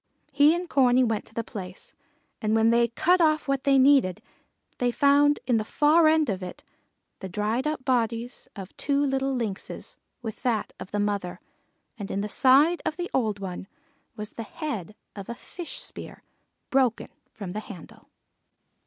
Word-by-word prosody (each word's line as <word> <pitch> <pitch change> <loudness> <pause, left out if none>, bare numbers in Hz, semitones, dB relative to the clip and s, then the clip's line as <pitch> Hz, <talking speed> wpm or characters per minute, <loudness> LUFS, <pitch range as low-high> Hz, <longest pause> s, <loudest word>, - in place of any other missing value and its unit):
He 290 +3 +5
and 355 +1 -4
Corney 255 -4 +4
went 225 -3 -1
to - - -20
the 230 - -1
place, 185 -4 -8 0.5
and 215 -1 +1
when 225 +1 +4
they 235 0 +4
cut 350 +10 +2
off 310 -2 +2
what 275 -1 -1
they 275 -1 +5
needed, 260 -9 +4 0.6
they 245 - +2
found 285 +3 +4
in 245 -2 +2
the 215 - 0
far 305 +7 +4
end 310 -1 +3
of 195 -3 -2
it 180 -1 -8 0.6
the 190 - -6
dried 215 +8 -1
up 300 -4 -3
bodies 235 -1 -1
of 195 -2 -9
two 285 0 +1
little 270 0 0
Lynxes 220 -6 -5 0.3
with 220 -2 -6
that 235 -4 -1
of - - -8
the 205 - -2
mother, 200 -3 -2 0.6
and 200 - -5
in 200 - -2
the 210 - -3
side 285 +9 +4
of 310 - -3
the 355 0 -4
old 220 -5 0
one 190 -1 -6 0.5
was 210 -1 -5
the - - -6
head 220 - -5 0.2
of 200 -2 -8
a 235 - -4
fish 350 +7 -8
spear - - -10 0.5
broken 260 -4 +1 0.2
from 195 -4 -7
the 210 - -4
handle. 200 -5 -12
240 Hz, 175 wpm, -26 LUFS, 210-285 Hz, 0.6 s, He